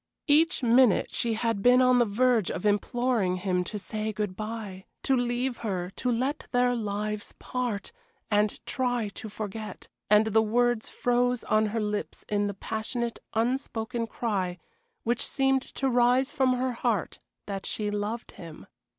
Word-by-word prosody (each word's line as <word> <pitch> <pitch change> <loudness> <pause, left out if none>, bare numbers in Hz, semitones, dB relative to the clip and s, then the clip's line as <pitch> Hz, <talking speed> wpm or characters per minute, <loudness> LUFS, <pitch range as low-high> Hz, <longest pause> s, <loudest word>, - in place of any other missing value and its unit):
Each 315 +1 +3
minute 240 -2 +4
she 230 -2 0
had 225 -2 -1
been 245 +3 +6
on 255 -1 +5
the 240 - +5
verge 230 0 +2
of 180 - -4
imploring 210 -1 +1
him 180 -1 0
to 210 - -5
say 215 +1 -3
good 210 -2 -3
bye 215 -3 -6 0.2
to 270 - +3
leave 245 0 0
her 185 -4 -3
to 250 +5 -1
let 260 +5 -1
their 245 0 +3
lives 210 -2 -3
part, 245 -6 -3 0.4
to 210 0 +2
try 245 -4 -1
to 215 +2 -8
forget, 210 -1 -6 0.2
and 210 +1 +6
the 220 0 +3
words 240 +1 +1
froze 245 0 +1
on 215 0 +2
her 225 +2 -2
lips 210 -1 -3
in 205 -1 +1
the 200 - -4
passionate, 230 +3 -3 0.2
unspoken 230 -1 -1
cry 195 -7 -2 0.5
which 240 +1 0
seemed 270 -1 +2
to 270 0 -3
rise 250 +2 +3
from 265 -4 +2
her 255 +1 0
heart 230 -5 -1 0.3
that 195 -1 -4
she 210 -1 -2
loved 210 +3 -3
him. 165 -3 -11
225 Hz, 160 wpm, -28 LUFS, 210-245 Hz, 0.5 s, been